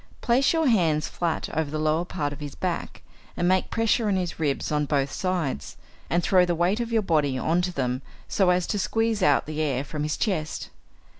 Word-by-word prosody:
Place 250 +3 +3
your 325 -1 +1
hands 170 - +2
flat 170 -2 -2
over 160 -2 0
the 155 - -3
lower 155 +2 +1
part 145 -5 -3
of 145 - -11
his 145 -2 -7
back, - - -4 0.3
and 175 - +1
make 185 0 +2
pressure 225 0 +1
on 200 - +2
his 180 -3 -2
ribs 145 -2 -1
on 150 0 +1
both 140 -2 0
sides, 175 - -2 0.3
and 175 +1 +1
throw 185 -2 +5
the 175 -1 +1
weight 175 +6 +1
of 235 -1 -3
your 225 -2 +2
body 150 -7 +1
on 165 +6 +1
to 180 0 -1
them 130 -4 -2 0.3
so 190 -3 +2
as 180 0 +2
to 205 - -2
squeeze 225 +1 0
out 145 -6 +4
the 155 0 -3
air 140 -4 0
from 150 +1 -5
his 150 0 -1
chest. 160 -8 -2
170 Hz, 215 wpm, -25 LUFS, 150-190 Hz, 0.3 s, throw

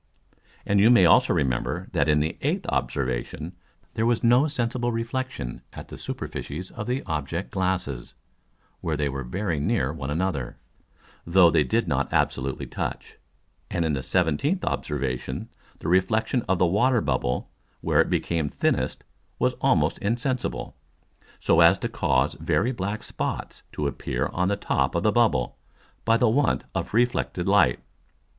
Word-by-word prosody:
And 100 0 +2
you 105 +3 +6
may 120 -7 +7
also 80 - +5
remember, 70 +8 -1
that 80 -4 +1
in 75 0 +4
the 80 - -1
eighth - - -1
Observation 65 +6 -2 0.4
there 110 - 0
was 120 0 +1
no 120 +5 +5
sensible 120 -3 -1
reflexion 115 - -4
at - - -9
the - - -8
Superficies 85 +6 -6
of 105 - -6
the 125 +2 -1
Object 80 +4 -3
glasses, 90 -10 -2 0.6
where 80 -3 -2
they 75 -1 0
were 70 0 -4
very 85 +5 -2
near 70 -1 0
one 70 -4 -5
another, 75 -6 -2 0.7
though 85 0 +5
they 80 -2 +4
did 65 - 0
not - - 0
absolutely 65 0 0
touch. - - -5 0.5
And 85 - -1
in 80 - 0
the 70 - -1
17th 90 - 0
Observation 65 -3 -3 0.3
the - - -7
Reflexion 95 +8 +2
of 95 - +3
the 90 - +3
Water 120 +8 +3
bubble 60 -9 -1 0.3
where - - +3
it - - 0
became 80 -4 0
thinnest - - -1 0.3
was - - +1
almost - - +2
insensible, 120 - -2 0.6
so 80 - +3
as 85 +3 +7
to - - -2
cause 65 -1 +1
very 120 +6 +1
black 100 -2 -3
Spots - - -4
to 75 - -2
appear 65 -2 -2
on 90 +1 +1
the 100 - +1
top 100 - 0
of - - 0
the - - +4
Bubble, 65 -1 +1 0.5
by 115 0 +4
the 120 - +3
want 130 +4 +2
of - - -3
reflected 85 - +1
Light. 90 -11 +4
85 Hz, 155 wpm, -25 LUFS, 70-110 Hz, 0.7 s, may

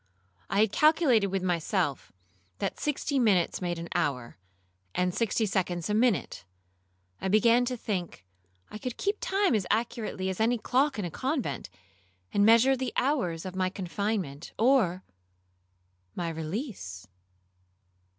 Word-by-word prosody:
I 200 +3 +2
had 215 -2 +3
calculated 300 -7 +4
with 190 -1 -2
myself, 170 - -1 0.5
that - - -3
sixty 285 -1 -1
minutes 195 -9 +2
made 175 -1 -2
an 170 +1 -6
hour, 140 - -2 0.6
and 180 0 +1
sixty 225 +1 +1
seconds 180 -2 -1
a - - +1
minute. 210 - +1 0.8
I - - -1
began 230 +5 +4
to 250 0 -2
think 180 - -4 0.5
I 215 - -7
could 250 +1 -5
keep 405 +1 -1
time 390 -5 +1
as 200 -5 0
accurately 220 -3 -1
as 190 - -4
any 235 +2 +2
clock 265 +5 +1
in 205 - -2
a 170 - -4
convent, 260 - -2 0.6
and 205 - +3
measure 230 +5 +6
the 260 0 -3
hours 220 - 0
of 185 0 -6
my 185 -1 +1
confinement 185 -4 -3
or—my 90 - -3
release. 160 - -5
195 Hz, 135 wpm, -28 LUFS, 165-235 Hz, 0.8 s, measure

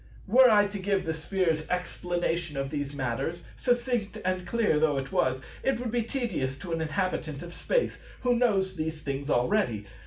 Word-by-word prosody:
Were 250 +5 +7
I 205 -2 +6
to 205 0 -4
give 190 -1 0
the 160 - 0
Sphere's 160 -1 0
explanation 175 -3 -1
of 135 0 -2
these 145 -2 -2
matters, 135 +6 -2
succinct 240 -4 0
and 185 -1 -1
clear 215 -9 +2
though 150 -2 +3
it 135 0 -3
was, 130 0 +1 0.2
it 265 -3 +1
would 245 -2 -3
be 240 0 +1
tedious 220 - -2
to 170 +5 -7
an 165 - -1
inhabitant 160 -2 -2
of 175 0 -8
Space, - - 0 0.2
who 245 -1 +3
knows 195 -6 +2
these 155 -1 -3
things 140 +1 -3
already. 120 - +1
175 Hz, 180 wpm, -28 LUFS, 150-210 Hz, 0.2 s, Were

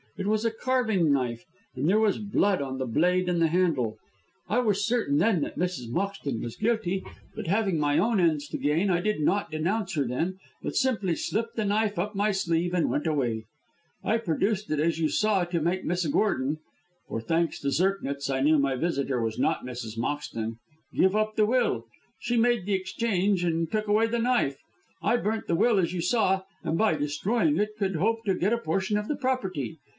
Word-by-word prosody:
It 195 - -3
was 215 +1 +1
a 230 - +2
carving 220 - +1
knife, 125 -4 -1 0.3
and 145 - -1
there 205 +5 +4
was 215 -3 +2
blood 200 -3 +1
on 135 -1 -4
the 130 - -2
blade 180 +9 +2
and 175 -1 +1
the 165 - +5
handle. 155 -10 +1 0.5
I 215 +6 +1
was 205 -4 +1
certain 225 -12 +1
then 195 -2 +3
that - - -4
Mrs. 175 -10 -2
Moxton 150 - -2
was 120 - -5
guilty, 210 -4 0 0.3
but - - -5
having 195 -3 +1
my 145 -1 +2
own 225 -2 +2
ends 155 -4 +2
to - - -3
gain 160 +7 +1
I 175 -1 +2
did 210 0 0
not 195 +6 +1
denounce 170 +7 -1
her 145 - +2
then, 165 +10 -2 0.2
but - - -4
simply 210 -10 +1
slipped 230 +7 -2
the 220 - -1
knife 210 0 +1
up 205 +5 -1
my 205 +2 +2
sleeve 175 -2 0
and 175 -3 +2
went 150 - -1
away. 120 -8 -1 0.6
I 225 - +2
produced 210 +1 -1
it 155 - 0
as 165 +1 +1
you 160 - +2
saw 210 +1 +2
to 170 -1 -2
make 175 +4 -1
Miss 175 +1 0
Gordon 145 -4 +1 0.5
for 115 - -3
thanks 165 +6 0
to 140 - 0
Zirknitz 140 -5 0
I 135 -1 0
knew 150 +2 +4
my 140 -1 +1
visitor 140 -4 -1
was 110 -1 -2
not - - +1
Mrs. 120 -3 -6
Moxton 115 -3 -3 0.4
give 190 +2 +3
up 215 0 0
the 215 - +4
will. 250 +4 +1 0.3
She 240 - -1
made 235 -4 +2
the 205 - 0
exchange 195 -1 0
and 165 -1 0
took 215 -1 -1
away 215 +2 +3
the 235 +1 -1
knife. 235 - +1 0.4
I 215 +8 +2
burnt 220 0 -2
the 170 - +1
will 220 +3 +3
as 175 -1 0
you 175 - -2
saw, 190 0 +2 0.2
and 165 - -1
by 215 -5 +3
destroying 155 +4 0
it 210 +2 -1
could 195 -3 -1
hope 225 +7 0
to 195 -2 +2
get 195 +5 +1
a - - +2
portion 195 +1 0
of 210 0 -3
the 295 - -1
property. 190 - -2
185 Hz, 205 wpm, -27 LUFS, 150-215 Hz, 0.6 s, the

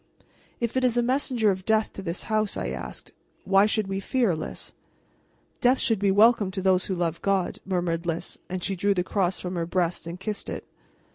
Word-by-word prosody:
"If 235 0 -2
it 260 - +1
is 245 -1 +2
a 240 - +3
messenger 250 -4 +2
of 190 0 -4
death 220 +1 +1
to - - -7
this 170 -1 -4
house," 215 -2 0
I 60 - -2 0.2
said, - - -10 0.3
"why 195 +2 +5
should 215 -1 +1
we 195 0 -3
fear, 225 -2 +1
Lys?" 155 - -6 0.9
"Death 250 +2 +4
should 225 -5 +1
be 200 0 +2
welcome 210 0 +5
to 190 0 -3
those 185 -1 +3
who 190 - -2
love 170 -2 -2
God," 195 -2 0
murmured 175 -2 -1
Lys, 165 0 -3
and 185 -1 -4
she 195 - 0
drew 200 +2 +1
the 180 - +1
cross 185 -1 0
from 180 0 -4
her 170 -2 -2
breast 175 -1 -1
and 170 +2 -6
kissed 210 +1 -4
it. - - -5
195 Hz, 210 wpm, -26 LUFS, 180-215 Hz, 0.9 s, why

